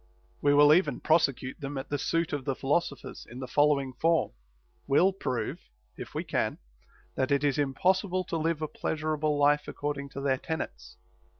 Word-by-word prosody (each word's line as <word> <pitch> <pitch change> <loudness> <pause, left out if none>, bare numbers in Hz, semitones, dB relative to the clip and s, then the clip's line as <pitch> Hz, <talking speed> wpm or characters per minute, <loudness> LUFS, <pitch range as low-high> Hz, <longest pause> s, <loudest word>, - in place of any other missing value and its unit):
* - - -35
We 145 0 +4
will 145 +1 +7
even 180 +4 +2
prosecute 140 -5 +1
them 140 0 -4
at 135 +2 -6
the 145 - -1
suit 165 +3 0
of 145 -2 -2
the 135 0 -1
philoso 140 +2 0
phers, - - -10
in 120 - -10
the 130 0 -5
following 140 -1 +2
form: 165 +5 +1 0.6
We'll 175 +8 +4
prove, 130 -10 -3 0.4
if - - -9
we - - -1
can, - - -1 0.6
that 130 - -1
it 140 0 +2
is 145 0 +1
impossible 185 +7 +1
to 170 - -3
live 160 0 -1
a - - -1
pleasurable 155 -1 -1
life 145 +1 +3
according 145 -1 -4
to 140 - -5
their 135 -2 +1
tenets. 65 - -6
145 Hz, 185 wpm, -28 LUFS, 140-160 Hz, 0.6 s, will